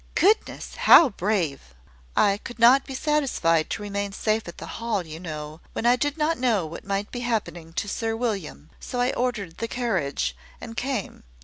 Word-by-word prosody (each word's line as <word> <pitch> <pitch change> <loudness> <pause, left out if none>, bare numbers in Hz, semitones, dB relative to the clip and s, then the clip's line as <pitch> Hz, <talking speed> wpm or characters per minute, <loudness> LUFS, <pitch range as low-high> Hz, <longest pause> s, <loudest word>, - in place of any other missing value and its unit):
"Goodness! 420 +5 +1
how 325 - +8
brave!" 175 - -2 0.4
"I 200 0 +4
could 240 - -8
not 245 +4 +6
be 270 - -6
satisfied 260 - +1
to 210 - -3
remain 200 -1 -3
safe 215 +1 0
at 170 - -8
the - - -7 0.2
Hall, 215 -6 -1
you 160 0 -8
know, 155 -2 -7
when - - -3
I 240 +1 +6
did 290 +4 -1
not 315 0 +1
know 230 -8 +2
what 160 +1 -8
might 200 +1 -2
be 245 - -4
happening 215 -9 -3
to 200 - -2
Sir 225 +2 -2
William; 195 - -4
so 245 - -5
I 245 +1 +2
ordered 215 -9 -2
the 230 - -2
carriage, 170 - -1 0.2
and 225 - -8
came. 255 -4 -3
215 Hz, 185 wpm, -25 LUFS, 170-245 Hz, 0.4 s, how